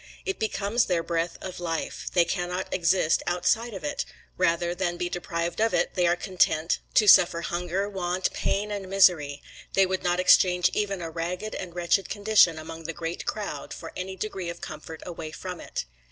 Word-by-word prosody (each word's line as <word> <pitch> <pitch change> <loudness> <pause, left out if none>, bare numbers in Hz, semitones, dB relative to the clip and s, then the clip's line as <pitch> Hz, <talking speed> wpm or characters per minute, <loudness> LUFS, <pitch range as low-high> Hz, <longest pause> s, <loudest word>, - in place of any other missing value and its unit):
It 385 - -2
becomes 220 +1 +1
their 175 -3 0
breath 170 0 -2
of 185 -1 -6
life; 165 -2 -3
they 175 -2 +5
cannot 180 +2 -3
exist 175 -2 +2
outside 215 +6 +1
of 185 - -7
it; 145 - -2 0.3
rather 175 -1 +1
than 175 -1 -2
be 175 - -2
deprived 170 +1 -3
of 225 -4 +2
it 175 - +1
they 180 -1 +2
are 170 - +3
content 175 -3 +1 0.2
to 215 - +5
suffer 175 -3 +7
hunger, 180 +3 -2
want, 185 -2 -1
pain, 210 +2 -1
and 200 -2 -4
misery; 175 -7 +3 0.3
they 195 - +5
would 185 0 -2
not 175 0 +1
exchange 180 -1 +5
even 200 -4 -1
a 165 - -5
ragged 180 +6 -4
and 180 -2 -6
wretched 175 +2 +1
condition 205 -5 +4
among 160 +1 -8
the 165 - -3
great 165 0 -5
crowd 210 -2 -4
for - - -8
any 190 +1 -5
degree 190 -2 -4
of 170 - -6
comfort 155 +1 -8
away 165 -3 -6
from 180 +2 -7
it. - - -5
180 Hz, 185 wpm, -26 LUFS, 170-195 Hz, 0.3 s, suffer